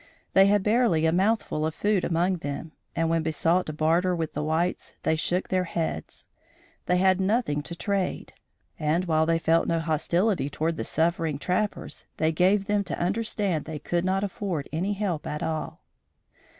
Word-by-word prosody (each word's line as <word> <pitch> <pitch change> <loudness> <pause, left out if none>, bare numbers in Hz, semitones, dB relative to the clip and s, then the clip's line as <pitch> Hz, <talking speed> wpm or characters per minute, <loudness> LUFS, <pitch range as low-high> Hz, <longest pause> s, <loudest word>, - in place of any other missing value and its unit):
They 195 0 +7
had 205 -1 +3
barely 210 -7 +3
a 160 - +4
mouthful 190 -3 +1
of 160 0 -1
food 205 -3 +1
among 175 +2 +1
them, 145 0 -5 0.2
and, 165 0 +1
when 165 0 +1
besought 165 +3 +1
to 155 - -3
barter 165 +4 +2
with 165 -2 -3
the 150 - -2
whites, 160 +4 -1
they 160 - +2
shook 175 +3 -1
their 185 -1 +1
heads. 165 - -4 0.6
They 180 - +3
had 190 0 +3
nothing 195 -7 +1
to 170 +3 -7
trade, 195 +1 -2 0.5
and, 155 +4 +1
while 160 -2 +2
they 165 0 +3
felt 165 0 +2
no 165 -1 +1
hostility 170 +2 +1
toward 160 +3 -2
the - - -2
suffering 165 -2 0
trappers, 185 +7 -2
they 160 0 +2
gave 190 +5 +3
them 205 0 +1
to - - -3
understand 195 -3 0
they 160 -1 -5
could 170 +4 -1
not 190 +1 +1
afford 190 -6 -3
any 185 +6 0
help 195 -6 -2
at 150 - -3
all. 160 -1 -4
170 Hz, 175 wpm, -26 LUFS, 160-190 Hz, 0.6 s, They